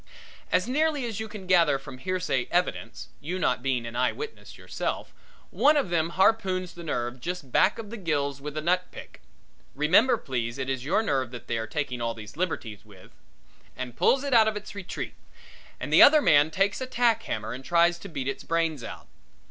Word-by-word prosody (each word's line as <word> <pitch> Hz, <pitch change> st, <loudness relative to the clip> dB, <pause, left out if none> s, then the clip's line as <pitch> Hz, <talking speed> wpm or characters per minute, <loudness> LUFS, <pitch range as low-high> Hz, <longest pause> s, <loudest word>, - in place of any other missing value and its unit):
As 180 Hz, +3 st, +2 dB
nearly 295 Hz, 0 st, +1 dB
as 225 Hz, -3 st, -4 dB
you 220 Hz, -, -4 dB
can 210 Hz, -3 st, -9 dB
gather 170 Hz, -6 st, +4 dB
from 135 Hz, -1 st, -11 dB
hearsay 180 Hz, -7 st, -1 dB
evidence, 120 Hz, -10 st, -2 dB
you 175 Hz, +6 st, -4 dB
not 125 Hz, -9 st, 0 dB
being 125 Hz, -3 st, -1 dB
an 115 Hz, 0 st, -7 dB
eye 125 Hz, +1 st, +2 dB
witness 445 Hz, +1 st, -8 dB
yourself, -, -, -4 dB, 0.4 s
one 300 Hz, +2 st, +4 dB
of 270 Hz, -11 st, 0 dB
them 165 Hz, -1 st, +1 dB
harpoons 190 Hz, -3 st, +2 dB
the 175 Hz, -, -10 dB
nerve 120 Hz, -5 st, -3 dB
just 175 Hz, -4 st, -5 dB
back -, -, +3 dB
of 220 Hz, -2 st, -8 dB
the 235 Hz, -, -6 dB
gills 145 Hz, -7 st, -1 dB
with 150 Hz, +1 st, -6 dB
a 155 Hz, -, -2 dB
nutpick 180 Hz, +2 st, -2 dB, 0.5 s
remember 195 Hz, -, +4 dB
please 120 Hz, -, -3 dB
it 135 Hz, 0 st, -2 dB
is 130 Hz, -2 st, -3 dB
your 170 Hz, +10 st, +1 dB
nerve 135 Hz, -, 0 dB
that 120 Hz, 0 st, -9 dB
they 115 Hz, -, -2 dB
are 110 Hz, -, -4 dB
taking 130 Hz, -2 st, -3 dB
all 115 Hz, 0 st, -1 dB
these 105 Hz, +1 st, -10 dB
liberties 130 Hz, -, -3 dB
with 100 Hz, -4 st, -17 dB, 0.7 s
and 125 Hz, -2 st, -5 dB
pulls 270 Hz, +1 st, +3 dB
it 280 Hz, -2 st, -1 dB
out 225 Hz, -2 st, +6 dB
of 215 Hz, -1 st, 0 dB
its 210 Hz, +1 st, -8 dB
retreat 200 Hz, -3 st, -6 dB, 0.7 s
and -, -, -4 dB
the -, -, +8 dB
other 305 Hz, +2 st, +9 dB
man 150 Hz, -, +5 dB
takes 195 Hz, +8 st, 0 dB
a 260 Hz, -, -3 dB
tack 240 Hz, -3 st, +2 dB
hammer 110 Hz, +1 st, -4 dB
and 130 Hz, +2 st, -8 dB
tries 170 Hz, +2 st, +3 dB
to 200 Hz, -, -9 dB
beat 140 Hz, -5 st, -4 dB
its 135 Hz, -, -3 dB
brains 165 Hz, -5 st, -1 dB
out. -, -, -8 dB
165 Hz, 205 wpm, -27 LUFS, 130-200 Hz, 0.7 s, other